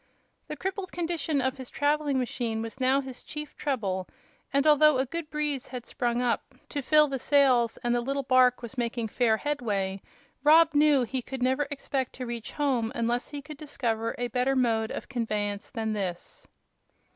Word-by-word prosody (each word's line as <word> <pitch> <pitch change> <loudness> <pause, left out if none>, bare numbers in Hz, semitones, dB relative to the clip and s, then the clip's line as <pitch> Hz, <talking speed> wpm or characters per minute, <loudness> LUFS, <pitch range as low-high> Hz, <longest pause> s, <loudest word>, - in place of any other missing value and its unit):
The - - -5
crippled 380 0 -4
condition 330 -4 -1
of 260 +1 -1
his 260 -2 -7
traveling 290 -1 +1
machine 235 -3 -2
was 225 +4 -7
now 265 +2 +3
his 260 -2 -9
chief 300 0 -8
trouble, 200 -10 -2 0.4
and 280 +1 +2
although 305 -1 +6
a 260 - +1
good 325 +3 -5
breeze 295 -3 -2
had 250 -2 -7
sprung 240 0 -1
up 245 +2 -1
to 285 - -2
fill 300 +3 +5
the 270 -2 -3
sails 255 -4 +3
and 240 0 +1
the 240 - +1
little 275 +3 -2
bark 255 -1 +4
was 245 +2 -6
making 235 -1 -1
fair 225 -1 +2
headway, 205 -9 -2 0.4
Rob 320 +2 +6
knew 290 -2 +5
he 255 +2 -2
could 260 +1 -5
never 265 +3 +1
expect 275 -2 -3
to 255 - -6
reach 235 -2 -5
home 260 -6 0
unless 235 +1 0
he 290 -1 -7
could 305 0 -9
discover 230 -6 -2
a 245 - -1
better 250 +3 +1
mode 225 -4 +1
of - - -6
conveyance 210 -5 -2
than 220 -3 -2
this. 185 -4 -5
255 Hz, 180 wpm, -28 LUFS, 235-290 Hz, 0.4 s, although